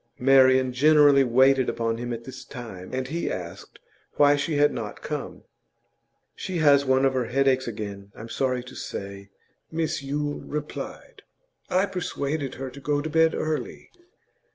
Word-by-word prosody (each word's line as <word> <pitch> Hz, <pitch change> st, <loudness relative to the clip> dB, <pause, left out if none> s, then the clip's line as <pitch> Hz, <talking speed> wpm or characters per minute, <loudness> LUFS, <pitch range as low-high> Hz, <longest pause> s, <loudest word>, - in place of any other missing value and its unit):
Marian 130 Hz, -1 st, +5 dB
generally 145 Hz, 0 st, +5 dB
waited 130 Hz, +1 st, +4 dB
upon 115 Hz, 0 st, -2 dB
him 120 Hz, 0 st, -4 dB
at 115 Hz, 0 st, -5 dB
this 130 Hz, +1 st, -9 dB
time, 110 Hz, -8 st, -9 dB
and 130 Hz, 0 st, -3 dB
he 170 Hz, +3 st, -2 dB
asked 85 Hz, -2 st, -7 dB, 0.4 s
why 145 Hz, 0 st, +5 dB
she 145 Hz, +2 st, -2 dB
had 145 Hz, 0 st, +3 dB
not 105 Hz, -3 st, -6 dB
come. -, -, -5 dB, 0.9 s
'She 185 Hz, -, -4 dB
has 145 Hz, -3 st, +5 dB
one 130 Hz, 0 st, +2 dB
of 135 Hz, -, +2 dB
her 130 Hz, -2 st, 0 dB
headaches 130 Hz, +1 st, +1 dB
again, 100 Hz, -3 st, -6 dB
I'm 110 Hz, -, -9 dB
sorry 125 Hz, 0 st, -1 dB
to 125 Hz, -, -12 dB
say,' 100 Hz, 0 st, -7 dB, 0.4 s
Mrs 160 Hz, -2 st, -2 dB
Yule 145 Hz, +1 st, -3 dB
replied. 150 Hz, 0 st, -7 dB, 0.5 s
'I 185 Hz, +2 st, +2 dB
persuaded 155 Hz, -7 st, -3 dB
her 130 Hz, 0 st, -6 dB
to 140 Hz, -, -11 dB
go 145 Hz, +1 st, 0 dB
to 155 Hz, +2 st, -4 dB
bed 160 Hz, +1 st, +3 dB
early. 155 Hz, -1 st, -4 dB
135 Hz, 155 wpm, -25 LUFS, 120-145 Hz, 0.9 s, Marian